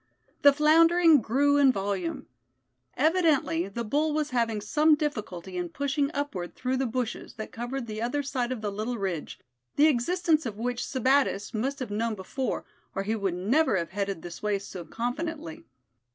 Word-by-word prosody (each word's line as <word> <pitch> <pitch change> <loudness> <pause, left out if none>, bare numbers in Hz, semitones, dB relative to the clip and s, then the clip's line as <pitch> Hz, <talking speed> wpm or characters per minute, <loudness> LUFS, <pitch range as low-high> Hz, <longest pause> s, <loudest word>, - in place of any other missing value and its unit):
The 285 - +8
floundering 325 +1 +5
grew 285 +6 +2
in 280 -2 +6
volume. 195 -5 -3 0.7
Evidently 300 - +2
the 235 +4 -4
bull 295 +7 0
was 305 -2 -1
having 230 -3 0
some 300 +9 +3
difficulty 210 - -4
in 175 -1 -2
pushing 280 - -1
upward 280 - -4
through 255 +1 -1
the 265 0 0
bushes 235 -1 -4
that 220 - -7
covered 240 +2 -4
the 215 -1 -5
other 285 +5 -1
side 255 -2 -2
of 250 -4 -3
the 210 -1 -2
little 220 +4 -3
ridge, 185 -7 -4 0.4
the 290 - +5
existence 315 +2 +2
of 210 -2 -6
which 245 +2 -2
Sebattis 260 -5 +1
must 265 +6 -1
have 255 -6 -5
known 225 +1 -1
before, 245 +7 -3 0.3
or 195 - -1
he 215 +3 -1
would 195 -5 -1
never 220 - +2
have 170 -2 -3
headed 195 -3 -3
this 175 -1 -8
way 210 -1 +1
so 195 -2 -8
confidently. 245 - -4
245 Hz, 170 wpm, -27 LUFS, 205-285 Hz, 0.7 s, The